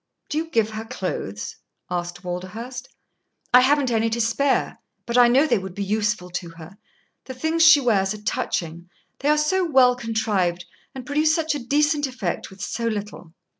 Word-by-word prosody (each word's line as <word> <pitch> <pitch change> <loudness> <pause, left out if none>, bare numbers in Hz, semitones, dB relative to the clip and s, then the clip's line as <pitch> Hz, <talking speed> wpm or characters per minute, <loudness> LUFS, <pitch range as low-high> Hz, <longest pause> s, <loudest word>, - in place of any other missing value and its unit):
"Do 300 - -1
you 325 0 -4
give 225 -7 +1
her 215 0 -5
clothes?" 185 - -5 0.3
asked 175 0 -4
Walderhurst. 225 +9 -6 0.6
"I 250 - +10
haven't 275 0 +2
any 225 0 +1
to 230 +1 -2
spare. 235 +5 0 0.3
But 235 - -3
I 245 -1 +7
know 260 +5 +4
they 305 - +2
would 190 -1 -8
be 200 - -3
useful 210 -3 -1
to 175 0 -5
her. 170 +4 -12 0.5
The 260 - -8
things 320 +5 -1
she 320 -2 +8
wears 205 -7 +1
are 210 - -11
touching; 170 -3 -3 0.3
they 285 - 0
are 300 - +4
so 315 +5 +1
well 260 -7 +4
contrived, 210 -7 -1 0.3
and 260 -2 -7
produce 305 +3 +2
such 320 -2 0
a 290 - -3
decent 295 +3 +1
effect 250 -9 -4
with 190 0 -14
so 230 +3 -3
little." 205 -6 -5
230 Hz, 180 wpm, -23 LUFS, 190-280 Hz, 0.6 s, I